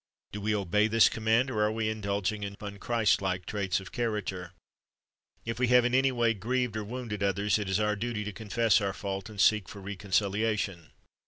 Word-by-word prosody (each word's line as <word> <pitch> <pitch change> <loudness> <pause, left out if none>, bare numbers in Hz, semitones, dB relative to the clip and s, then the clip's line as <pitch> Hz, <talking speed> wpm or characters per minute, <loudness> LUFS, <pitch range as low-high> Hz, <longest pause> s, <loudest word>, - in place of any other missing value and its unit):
"^ - - -58
Do 105 - -6
we 105 +1 0
obey 105 +2 +2
this 115 +1 +5
command, 115 +4 +1
or 105 - -1
are 105 0 +2
we 110 0 -1
indulging 105 -1 -2
sharp, 100 0 -5
unchristlike 100 -3 0
traits 100 -3 -1
of 95 - -11
character? 105 -6 -3 0.9
If 115 +1 -4
we 125 - +2
have 125 0 +5
in 125 - 0
any 135 +1 +4
way 120 -2 +2
grieved 120 +2 -1
or 110 - -2
wounded 115 -2 -5
others, 100 +2 +1
it 100 -2 -3
is 95 +2 +1
our 105 0 +1
duty 110 0 -3
to 105 -1 -5
confess 110 0 +2
our 100 -1 -1
fault, 95 0 -5
and 105 -2 -10
seek 105 +2 +4
for 100 - -9
reconciliation. 100 -2 -1
105 Hz, 195 wpm, -29 LUFS, 100-115 Hz, 0.9 s, this